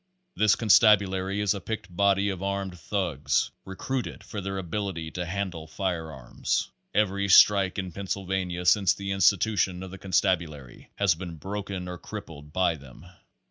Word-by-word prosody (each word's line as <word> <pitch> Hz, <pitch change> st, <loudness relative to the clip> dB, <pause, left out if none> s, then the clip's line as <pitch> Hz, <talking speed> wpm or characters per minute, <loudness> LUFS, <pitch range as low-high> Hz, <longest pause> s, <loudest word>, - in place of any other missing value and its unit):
This 105 Hz, -1 st, +4 dB
constabulary 100 Hz, -3 st, +4 dB
is 105 Hz, -1 st, +2 dB
a 100 Hz, -, -6 dB
picked 95 Hz, -3 st, -6 dB
body 100 Hz, +1 st, +3 dB
of 95 Hz, -2 st, -4 dB
armed 100 Hz, -1 st, -2 dB
thugs 85 Hz, -6 st, -1 dB
recruited 125 Hz, +7 st, -4 dB
for 105 Hz, -, -6 dB
their 95 Hz, +1 st, -4 dB
ability 90 Hz, -3 st, -4 dB
to 90 Hz, -1 st, -4 dB
handle 90 Hz, -3 st, -4 dB
fire 85 Hz, -2 st, -3 dB
arms. 65 Hz, -4 st, -2 dB, 0.2 s
Every 100 Hz, -1 st, +1 dB
strike 95 Hz, 0 st, +6 dB
in 95 Hz, -2 st, -3 dB
Pennsylvania 95 Hz, -1 st, -3 dB
since 90 Hz, -1 st, +4 dB
the 100 Hz, -1 st, -4 dB
institu 100 Hz, +2 st, +3 dB
tion 90 Hz, -1 st, 0 dB
of 95 Hz, -, -8 dB
the 95 Hz, -, -9 dB
constabulary 85 Hz, -8 st, -1 dB
has 100 Hz, -4 st, +3 dB
been 85 Hz, 0 st, -7 dB
broken 95 Hz, +1 st, -5 dB
or 90 Hz, -1 st, -6 dB
crippled 75 Hz, 0 st, -9 dB
by 85 Hz, -1 st, +1 dB
them. 70 Hz, +3 st, -14 dB
95 Hz, 155 wpm, -27 LUFS, 90-100 Hz, 0.2 s, strike